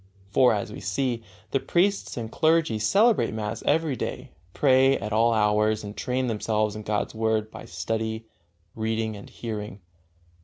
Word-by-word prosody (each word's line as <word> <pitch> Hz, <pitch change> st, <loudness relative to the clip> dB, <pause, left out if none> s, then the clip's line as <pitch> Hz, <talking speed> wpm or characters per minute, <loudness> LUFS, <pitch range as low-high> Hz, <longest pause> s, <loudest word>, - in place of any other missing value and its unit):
For, 125 Hz, +1 st, +5 dB
as 100 Hz, -, -4 dB
we -, -, -7 dB
see, 115 Hz, +5 st, -1 dB, 0.3 s
the 135 Hz, -, +2 dB
priests 175 Hz, +8 st, 0 dB
and 115 Hz, -2 st, -4 dB
clergy 160 Hz, -8 st, +2 dB
celebrate 205 Hz, -, +3 dB
mass 105 Hz, -1 st, -3 dB
every 155 Hz, -1 st, +2 dB
day, -, -, -5 dB, 0.2 s
pray 135 Hz, +3 st, +4 dB
at 105 Hz, +1 st, -5 dB
all 115 Hz, +2 st, +4 dB
hours 105 Hz, 0 st, +2 dB
and 105 Hz, 0 st, -7 dB
train 130 Hz, +1 st, -1 dB
themselves 110 Hz, -2 st, 0 dB
in 110 Hz, -, -5 dB
God's 105 Hz, 0 st, -2 dB
Word 110 Hz, -1 st, 0 dB
by -, -, -9 dB
study, 110 Hz, +6 st, -3 dB, 0.5 s
reading 110 Hz, 0 st, -2 dB
and 100 Hz, -, -11 dB
hearing. 105 Hz, -3 st, -6 dB
110 Hz, 155 wpm, -26 LUFS, 105-130 Hz, 0.5 s, For